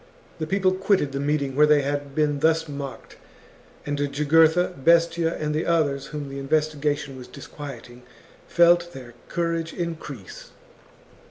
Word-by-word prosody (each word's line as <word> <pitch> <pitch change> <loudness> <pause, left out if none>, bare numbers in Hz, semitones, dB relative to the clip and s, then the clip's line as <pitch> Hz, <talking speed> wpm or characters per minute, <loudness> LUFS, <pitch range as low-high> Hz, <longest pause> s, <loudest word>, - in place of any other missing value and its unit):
The 155 - -3
people 190 +1 +2
quitted 190 -6 +1
the 140 - -3
meeting 140 -2 -1
where 150 +1 +5
they 150 -1 +4
had 145 0 -3
been 150 -2 +1
thus 160 +1 +2
mocked, 140 -2 -8 0.7
and 145 0 -3
Jugurtha, 160 +5 +3
Bestia, 170 0 +3
and 150 -1 -2
the 155 +2 -1
others 145 -5 +1
whom 150 -2 -6
the 135 0 -6
investigation 145 -1 -1
was 125 -1 -10
dis - - -11
quieting, 125 -4 -10 0.5
felt 175 0 +4
their 125 -3 -10 0.2
courage 165 -1 -2
increase. 160 - -7
150 Hz, 145 wpm, -24 LUFS, 140-165 Hz, 0.7 s, where